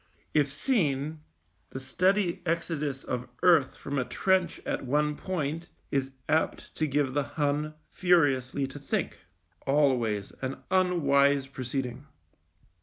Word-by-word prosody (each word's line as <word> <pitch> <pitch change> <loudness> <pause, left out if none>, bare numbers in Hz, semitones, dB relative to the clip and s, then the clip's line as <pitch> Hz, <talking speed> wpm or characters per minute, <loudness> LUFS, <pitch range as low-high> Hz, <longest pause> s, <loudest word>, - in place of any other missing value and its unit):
If 145 -2 +3
seen, 155 - 0 0.5
the 130 - -6
steady 185 +7 +1
exodus 160 -5 -2
of 125 0 -4
earth 165 -7 +5
from 140 0 -3
a - - +1
trench 185 +3 +1
at - - -2
one 150 +3 +1
point 165 -1 -3 0.2
is 135 -2 0 0.2
apt 160 +1 0
to 155 - +1
give 140 -2 +1
the 145 - +2 0.2
Hun 150 +1 0 0.2
furiously 145 -7 +2
to 135 +2 -8
think— 140 - -2 0.5
always 125 -8 +2
an 135 0 -3
unwise 140 -7 +3
proceeding. 130 0 -4
145 Hz, 120 wpm, -28 LUFS, 135-165 Hz, 0.5 s, earth